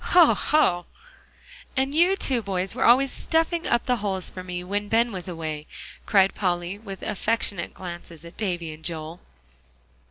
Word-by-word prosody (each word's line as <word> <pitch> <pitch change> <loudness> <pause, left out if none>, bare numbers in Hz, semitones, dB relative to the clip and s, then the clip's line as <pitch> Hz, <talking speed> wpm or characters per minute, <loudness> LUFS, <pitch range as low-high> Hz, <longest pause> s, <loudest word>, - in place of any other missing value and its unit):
Hoh 345 -3 +8
hoh!" 175 - +2 0.9
"And 270 +1 +1
you 350 +5 +4
two 260 -10 0
boys 190 -2 -2
were - - 0
always 260 +3 +5
stuffing 330 +1 0
up 240 - +2
the 250 -1 +2
holes 195 -4 -1
for 185 - -7
me, 180 -1 -5
when 205 +3 -2
Ben 230 +1 +3
was 185 -2 -6
away," 155 -3 -5 0.4
cried 195 -2 +4
Polly, 180 0 -1
with 195 -3 -8
affectionate 210 -3 -1
glances 170 -3 -8
at 170 - -11
Davie 175 -6 -2
and 155 +1 -14
Joel. 165 0 -4
195 Hz, 160 wpm, -25 LUFS, 175-235 Hz, 0.9 s, Hoh